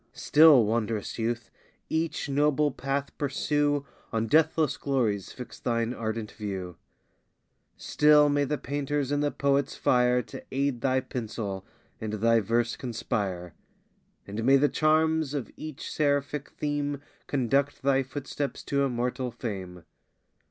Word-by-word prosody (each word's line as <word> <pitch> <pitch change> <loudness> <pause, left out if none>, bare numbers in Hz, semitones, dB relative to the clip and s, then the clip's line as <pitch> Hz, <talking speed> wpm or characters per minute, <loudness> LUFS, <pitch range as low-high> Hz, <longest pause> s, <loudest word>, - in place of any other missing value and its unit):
Still, 150 -6 +6
wond'rous 110 0 -2
youth! 115 +1 -2 0.4
each 160 -1 -1
noble 145 +1 +2
path 140 +1 -3
pursue, 145 0 0 0.3
On 115 0 0
deathless 155 +4 +3
glories 115 -8 -1
fix 125 - -9
thine 115 0 -1
ardent 110 -2 -4
view: 95 -5 -5 1.0
Still 150 0 +5
may 145 0 +2
the 150 +2 -1
painter's 145 0 -2
and 145 0 +1
the 145 - +2
poet's 140 -1 0
fire 125 0 +3
To - - -10
aid 135 -3 -1
thy 130 -1 +2
pencil, 110 -6 -5 0.3
and 110 -1 -4
thy 115 +2 +3
verse 115 +3 0
conspire! 100 -8 -3 0.7
And 105 +3 -4
may 135 +3 +6
the 145 +2 +3
charms 155 -1 +2
of 135 -5 -4
each 155 -3 -7
seraphic 145 -1 0
theme 145 -1 -2 0.3
Conduct 140 +1 0
thy 135 0 +3
footsteps 135 +1 -5
to 140 0 0
immortal 125 -1 -1
fame! 95 -7 -6
135 Hz, 130 wpm, -27 LUFS, 115-145 Hz, 1.0 s, Still